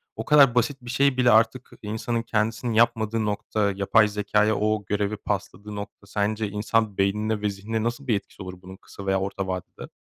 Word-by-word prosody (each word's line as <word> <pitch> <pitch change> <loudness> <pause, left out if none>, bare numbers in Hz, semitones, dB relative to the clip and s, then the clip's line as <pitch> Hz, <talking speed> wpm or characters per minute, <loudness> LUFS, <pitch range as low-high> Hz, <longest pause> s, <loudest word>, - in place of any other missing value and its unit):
O - - -5
kadar 140 -5 +6
basit 135 +3 +1
bir 120 - -10
şey 135 +1 +2
bile 125 -2 +4
artık 115 +3 +3
insanın 110 +2 -2
kendisinin 115 +2 -1
yapmadığı 115 -1 +2
nokta, 105 0 -1
yapay 105 +2 +4
zekâya 105 +1 +1
o 105 -1 0
görevi 105 +1 -1
pasladığı 105 +2 -5
nokta. 100 0 -8
Sence 105 +1 -1
insan 105 0 0
beynine 105 +2 0
ve 105 - +1
zihnine 110 +3 -3
nasıl 120 +4 -3
bir 110 - +3
etkisi 100 0 -7
olur 90 -1 -8
bunun 95 +1 -11
kısa 100 - -12
veya 95 0 +1
orta 95 0 -3
vadede? 95 -1 -6
105 Hz, 185 wpm, -25 LUFS, 100-115 Hz, -, kadar